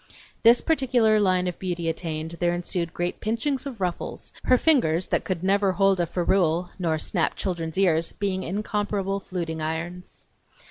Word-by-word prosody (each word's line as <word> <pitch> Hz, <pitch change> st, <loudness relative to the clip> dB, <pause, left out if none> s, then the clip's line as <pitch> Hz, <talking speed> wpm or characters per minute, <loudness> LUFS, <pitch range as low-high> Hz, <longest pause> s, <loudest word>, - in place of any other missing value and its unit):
This 235 Hz, +1 st, +6 dB
particular 250 Hz, -8 st, +3 dB
line 185 Hz, -2 st, +2 dB
of 180 Hz, -, -4 dB
beauty 175 Hz, -3 st, -3 dB
attained, 160 Hz, 0 st, -3 dB
there 175 Hz, 0 st, +1 dB
ensued 175 Hz, -1 st, -2 dB
great 175 Hz, +1 st, -3 dB
pinchings 250 Hz, +6 st, -1 dB
of 250 Hz, -6 st, -7 dB
ruffles, 180 Hz, -2 st, -4 dB
her 255 Hz, -, +5 dB
fingers 185 Hz, -, +2 dB
that -, -, +1 dB
could 185 Hz, -2 st, -3 dB
never 195 Hz, 0 st, +2 dB
hold 195 Hz, 0 st, +3 dB
a 170 Hz, -, +1 dB
ferrule 175 Hz, -1 st, +1 dB
nor 165 Hz, -3 st, 0 dB
snap 160 Hz, +1 st, -1 dB
children's 170 Hz, -4 st, -3 dB
ears 165 Hz, -4 st, +2 dB
being 195 Hz, -2 st, -2 dB
incomparable 200 Hz, 0 st, -2 dB
fluting 170 Hz, -4 st, -4 dB
irons. 170 Hz, +3 st, -5 dB
185 Hz, 155 wpm, -25 LUFS, 170-205 Hz, -, This